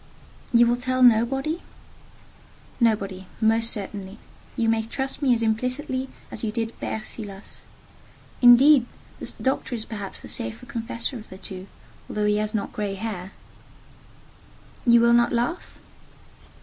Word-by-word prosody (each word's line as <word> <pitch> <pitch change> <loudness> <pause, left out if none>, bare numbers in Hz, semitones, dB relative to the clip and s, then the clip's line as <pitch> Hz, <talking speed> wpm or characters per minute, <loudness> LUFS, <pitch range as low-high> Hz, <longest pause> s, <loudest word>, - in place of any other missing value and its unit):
"You 240 0 +6
will 240 +1 +2
tell 255 +1 0
nobody?" 270 +8 +3 1.2
"Nobody—most 220 +1 +1
certainly. 200 -1 -4 0.4
You 230 - +1
may 225 0 +3
trust 265 +6 -3
me 275 -3 +3
as 230 - 0
implicitly 255 +4 -1 0.2
as - - -3
you 215 - -1
did 225 0 -2
Père 215 0 -4
Silas. 200 -3 -7 0.8
Indeed, 245 +1 +8 0.3
the - - -2
doctor 265 -1 -1
is 220 -1 -3
perhaps 205 -4 -7
the - - -8
safer 115 - -3
confessor 235 0 -3
of 215 - -13
the 190 - -10
two, 190 -1 -8 0.4
though 210 0 -1
he 210 0 +3
has 215 +1 -1
not 205 - -2
grey 205 -2 -2
hair." 195 -3 -5 1.6
"You 235 0 +7
will 235 0 +5
not 240 0 +4
laugh?" 240 +9 -2
230 Hz, 135 wpm, -24 LUFS, 210-250 Hz, 1.6 s, Indeed